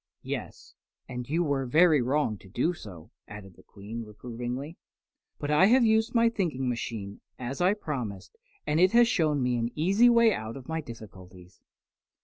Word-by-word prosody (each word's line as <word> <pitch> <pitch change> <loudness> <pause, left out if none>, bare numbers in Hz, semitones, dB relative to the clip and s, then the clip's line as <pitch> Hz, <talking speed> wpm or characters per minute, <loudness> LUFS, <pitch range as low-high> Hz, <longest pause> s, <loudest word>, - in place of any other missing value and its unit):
"Yes, - - -7 0.3
and 125 -1 -6
you 165 +4 +1
were 140 -4 -1
very 155 +1 +5
wrong 130 -2 0
to 95 - -16
do 125 - 0
so," 95 - -12 0.2
added 105 -2 -11
the - - -18
Queen, 105 +4 -9
reprovingly. 120 +7 -7 0.6
"But 145 - -3
I 150 +6 +5
have 245 +2 +5
used 220 +2 +2
my 230 0 +5
thinking 165 - -1
machine, 115 -4 -4 0.2
as 130 +4 -5
I 185 +3 +3
promised, 125 - -6 0.3
and 150 - +1
it 185 +3 +4
has 240 0 +6
shown 155 - +1
me 125 -1 +1
an 115 0 -1
easy 195 +10 +4
way 235 -2 +5
out 110 -2 -5
of 130 - -12
my 160 0 -2
difficulties." 95 - -13
135 Hz, 170 wpm, -28 LUFS, 115-175 Hz, 0.6 s, has